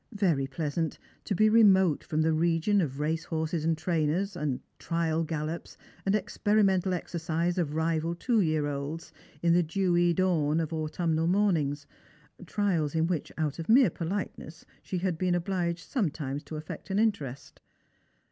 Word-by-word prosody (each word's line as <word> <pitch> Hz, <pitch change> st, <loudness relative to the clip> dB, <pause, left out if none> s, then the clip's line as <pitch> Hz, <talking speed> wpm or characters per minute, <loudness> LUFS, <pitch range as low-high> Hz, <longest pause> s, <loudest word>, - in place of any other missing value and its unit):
Very 165 Hz, -9 st, +2 dB
pleasant 155 Hz, +3 st, -2 dB, 0.3 s
to 200 Hz, -, -1 dB
be 215 Hz, +4 st, +4 dB
remote 190 Hz, -7 st, +5 dB
from 155 Hz, 0 st, 0 dB
the 160 Hz, 0 st, +2 dB
region 170 Hz, +5 st, +2 dB
of 140 Hz, -4 st, -3 dB
racehorses 160 Hz, +1 st, -1 dB
and 165 Hz, 0 st, +1 dB
trainers, 170 Hz, +4 st, 0 dB
and 150 Hz, -6 st, -2 dB, 0.2 s
trial 165 Hz, -1 st, 0 dB
gallops 155 Hz, +1 st, -4 dB, 0.3 s
and 195 Hz, -, +3 dB
experimental 200 Hz, -3 st, +2 dB
exercise 170 Hz, +1 st, -2 dB
of 155 Hz, -3 st, -1 dB
rival 165 Hz, +1 st, 0 dB
two 230 Hz, +4 st, +1 dB
year 155 Hz, -4 st, +1 dB
olds, 145 Hz, +3 st, -5 dB, 0.3 s
in 170 Hz, -1 st, +4 dB
thft 175 Hz, -2 st, +3 dB
'jewy 175 Hz, -1 st, +2 dB
dawn 165 Hz, -4 st, +2 dB
of 165 Hz, 0 st, -2 dB
autumnal 160 Hz, +1 st, -1 dB
mornings; 165 Hz, -7 st, +1 dB, 0.6 s
trials 170 Hz, -7 st, 0 dB
in 160 Hz, 0 st, +2 dB
which, 170 Hz, -4 st, -2 dB
out 155 Hz, -1 st, -2 dB
of 165 Hz, -, -6 dB
mere 235 Hz, -4 st, +6 dB
politeness, 170 Hz, -2 st, -5 dB, 0.2 s
she 185 Hz, -, -4 dB
had 180 Hz, -2 st, -1 dB
been 180 Hz, -1 st, +1 dB
obliged 175 Hz, -1 st, -2 dB
sometimes 150 Hz, -, -2 dB
to 155 Hz, -, -9 dB
affect 155 Hz, +5 st, -7 dB
an 195 Hz, -, 0 dB
interest. 200 Hz, -, -2 dB
165 Hz, 150 wpm, -29 LUFS, 155-185 Hz, 0.6 s, mere